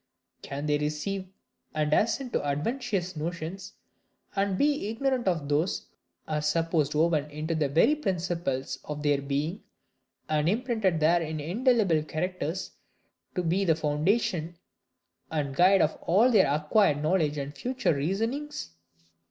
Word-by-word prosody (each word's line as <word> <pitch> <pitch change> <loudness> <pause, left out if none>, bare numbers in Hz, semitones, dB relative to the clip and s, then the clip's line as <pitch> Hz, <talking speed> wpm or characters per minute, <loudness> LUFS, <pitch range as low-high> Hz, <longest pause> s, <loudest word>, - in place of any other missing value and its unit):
Can 140 +1 -5
they 150 -1 +1
receive 155 +6 -2 0.5
and 150 -1 +1
assent 240 - +1
to - - 0
adventitious 180 - -2
notions, 170 +4 -5 0.6
and 195 -1 +1
be 285 -5 +1
ignorant 250 0 -1
of 165 -6 0
those 150 +6 +1
which - - -28 0.4
are 150 -1 -1
supposed 155 -1 +1
woven 155 -2 +2
into 155 +2 -3
the 155 -3 0
very 165 - +4
principles 170 - -2
of 150 0 -6
their 145 -1 +2
being, 145 +7 -2 0.7
and 155 +1 +1
imprinted 220 -6 +1
there 170 +3 +4
in 155 -1 -3
indelible 195 - +2
characters, 175 +3 -3 0.6
to 180 - 0
be 175 +4 +1
the 165 -4 +3
foundation 160 +2 0 0.7
and 145 -4 -2
guide 185 +4 +5
of 155 - 0
all 215 +9 +4
their 195 - +5
acquired 150 +1 +2
knowledge 155 -3 +1
and 140 0 -4
future 250 - 0
reasonings? 225 - -2
165 Hz, 135 wpm, -28 LUFS, 150-195 Hz, 0.7 s, guide